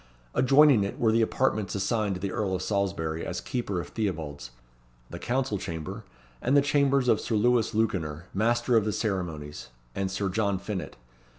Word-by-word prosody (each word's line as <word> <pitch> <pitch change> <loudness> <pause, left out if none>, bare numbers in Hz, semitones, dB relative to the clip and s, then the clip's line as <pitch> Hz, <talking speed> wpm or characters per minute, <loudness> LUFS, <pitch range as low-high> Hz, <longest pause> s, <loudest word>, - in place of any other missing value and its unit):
Adjoining 135 -3 +5
it 100 - -4
were 115 -2 +3
the 115 +1 +3
apartments 110 -4 0
assigned 100 0 0
to - - -5
the 100 -1 -2
Earl 95 -3 -1
of 90 - -3
Salisbury 85 -6 -1
as - - -3
Keeper 110 -7 -3
of 75 - -6
Theobalds, 80 - -3 0.6
the - - -6
council 125 -5 -1
chamber, 90 +7 -6 0.4
and 140 +3 +3
the - - +7
chambers 140 -2 +2
of 110 - +3
Sir 115 - -1
Lewis 115 0 +2
Lewkener, 85 -8 -1
Master 120 +4 +2
of 110 - +5
the 105 0 -1
Ceremonies, 85 -9 -3 0.3
and 95 -1 -2
Sir 95 +1 -2
John 100 0 0
Finett. 95 0 -5
105 Hz, 175 wpm, -27 LUFS, 95-120 Hz, 0.6 s, the